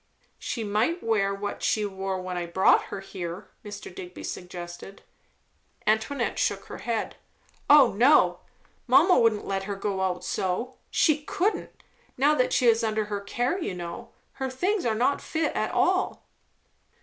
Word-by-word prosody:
"She 230 - -3
might 220 - 0
wear 215 -3 +1
what 200 +1 -4
she 215 -1 +1
wore 190 -1 -3
when 185 0 -5
I 175 -1 -3
brought 190 +3 +4
her 200 - -6
here," 180 -2 -7
Mr. 205 -3 -8
Digby 180 0 -9
suggested. 175 +1 -8 0.8
Antoinette 220 +6 0
shook - - 0
her - - -9
head. 230 -2 -3 0.5
"O 290 -1 +7
no! 255 +9 +4 0.5
Mamma 365 - +6
wouldn't 225 -3 +2
let 195 -1 -2
her 200 0 -3
go 195 -1 -2
out 180 -1 -1
so. 230 +8 -2
She 310 -2 +3
couldn't, 375 +7 -2 0.3
now 285 +4 +4
that 255 -4 +1
she 255 - +2
is 230 -1 +4
under 215 -1 0
her 200 - -2
care, 245 - -1
you 190 - -3
know. 175 +7 -7 0.2
Her 265 0 -4
things 355 - 0
are 220 - +1
not 255 +5 +1
fit 320 0 -2
at - - -1
all." - - +1
210 Hz, 160 wpm, -26 LUFS, 190-255 Hz, 0.8 s, O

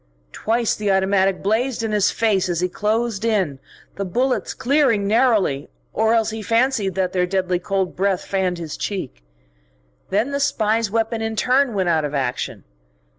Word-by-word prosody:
Twice 230 - 0
the 210 -1 -2
automatic 190 0 +2
blazed 230 +4 0
in 220 - -1
his 210 -2 +3
face 205 -5 +1
as 170 -2 -1
he 180 - +2
closed 215 +2 -1
in, 190 -12 0 0.4
the 200 - -2
bullets 250 +8 -1
clearing 255 -6 +2
narrowly 210 - +2 0.2
or 220 +2 +2
else 225 -1 +1
he 220 0 -5
fancied 230 -3 +1
that 185 -1 -1
their 180 -1 +1
deadly 185 -1 0
cold 190 0 -2
breath 190 -1 0
fanned 190 -2 -1
his 165 -3 -6
cheek. 185 - -5 0.9
Then 215 +8 0
the 280 - -1
spy's 225 -5 +1
weapon 225 +1 -1
in 220 0 -2
turn 255 +1 +2
went 190 -3 +1
out 160 -2 +2
of 150 0 -3
action. 130 -3 -3
205 Hz, 170 wpm, -21 LUFS, 185-230 Hz, 0.9 s, his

